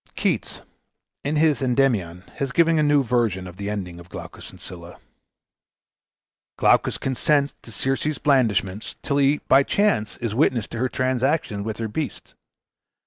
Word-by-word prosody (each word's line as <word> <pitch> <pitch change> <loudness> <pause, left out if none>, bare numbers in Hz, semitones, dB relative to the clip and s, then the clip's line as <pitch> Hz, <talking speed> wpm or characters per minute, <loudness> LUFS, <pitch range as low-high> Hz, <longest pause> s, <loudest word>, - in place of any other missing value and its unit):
Keats, - - -1 0.6
in 145 +2 -1
his 155 -2 +3
"Endymion," 120 -10 +1
has 135 -2 -2
given 165 +1 +3
a - - +4
new 145 -2 +4
version 115 -6 0
of 90 0 -10
the 100 +1 -4
ending 90 -4 -5
of 85 +1 -14
"Glaucus - - -9
and - - -15
Scylla." 85 -1 -10 1.6
Glaucus - - +3
consents 140 +2 +1
to 115 - -12
Circe's 135 +6 -1
blandishments, 110 -8 +1
till 140 - 0
he 140 +1 +3
by 135 - +6
chance 140 - +1
is 115 -3 -3
witness 120 -3 +2
to 115 - -6
her 130 +1 +1
transactions 130 -3 0
with 110 0 -4
her 115 - -3
beasts. 150 +8 -5
125 Hz, 150 wpm, -23 LUFS, 105-140 Hz, 1.6 s, by